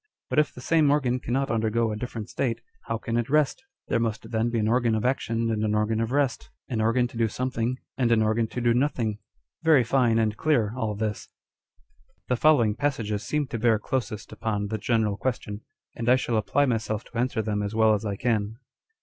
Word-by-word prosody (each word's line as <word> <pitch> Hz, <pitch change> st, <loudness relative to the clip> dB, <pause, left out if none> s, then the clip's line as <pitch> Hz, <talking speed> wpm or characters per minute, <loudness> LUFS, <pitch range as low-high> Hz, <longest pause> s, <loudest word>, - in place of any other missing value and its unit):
But -, -, +3 dB
if 150 Hz, -, +2 dB
the 125 Hz, -, -11 dB
same 155 Hz, +2 st, +3 dB
organ 130 Hz, -4 st, +2 dB
cannot 130 Hz, +1 st, -1 dB
undergo 115 Hz, 0 st, +1 dB
a -, -, -2 dB
different 115 Hz, -1 st, -5 dB
state, 120 Hz, -2 st, -2 dB, 0.3 s
how -, -, -2 dB
can 115 Hz, +1 st, -3 dB
it 120 Hz, +1 st, -1 dB
rest? 150 Hz, -, +2 dB, 0.2 s
There 115 Hz, -, +1 dB
must 110 Hz, -2 st, -3 dB
then 115 Hz, +1 st, +1 dB
be 120 Hz, -, -1 dB
an 110 Hz, -1 st, +1 dB
organ 120 Hz, -1 st, +2 dB
of 110 Hz, -, -1 dB
action 115 Hz, -3 st, 0 dB
and 110 Hz, -1 st, -1 dB
an 105 Hz, 0 st, +1 dB
organ 110 Hz, +1 st, +1 dB
of 115 Hz, +1 st, -2 dB
rest, 140 Hz, -1 st, 0 dB, 0.2 s
an 115 Hz, -4 st, -1 dB
organ 120 Hz, +3 st, +2 dB
to 120 Hz, -, -10 dB
do 115 Hz, -1 st, +2 dB
something 125 Hz, +1 st, -2 dB, 0.2 s
and 120 Hz, -2 st, +2 dB
an 110 Hz, -1 st, +4 dB
organ 110 Hz, +1 st, +1 dB
to 125 Hz, -, -5 dB
do 120 Hz, 0 st, +3 dB
nothing! 120 Hz, -5 st, 0 dB, 0.4 s
Very 160 Hz, -6 st, +5 dB
fine 120 Hz, -1 st, +2 dB
and 110 Hz, -2 st, +1 dB
clear 120 Hz, -7 st, +1 dB
all 110 Hz, -4 st, -2 dB
this. 105 Hz, 0 st, -3 dB, 1.0 s
The 125 Hz, -, +3 dB
following 120 Hz, -6 st, +4 dB
passages 115 Hz, -6 st, -1 dB
seem 150 Hz, -1 st, -1 dB
to 115 Hz, -, -3 dB
bear 115 Hz, -1 st, +3 dB
closest 105 Hz, -2 st, -3 dB
upon 105 Hz, -2 st, -2 dB
the 110 Hz, 0 st, -2 dB
general 110 Hz, -3 st, +1 dB
question, 105 Hz, -3 st, -3 dB, 0.3 s
and 115 Hz, 0 st, -2 dB
I 125 Hz, -, +7 dB
shall 125 Hz, -2 st, -1 dB
apply 135 Hz, +6 st, +2 dB
myself 115 Hz, -3 st, -1 dB
to 120 Hz, -, -10 dB
answer 120 Hz, -3 st, 0 dB
them 105 Hz, -1 st, -1 dB
as 105 Hz, +1 st, -3 dB
well 110 Hz, -1 st, +5 dB
as 105 Hz, 0 st, -1 dB
I 100 Hz, -2 st, -2 dB
can. 110 Hz, -1 st, -1 dB
115 Hz, 215 wpm, -26 LUFS, 110-125 Hz, 1.0 s, I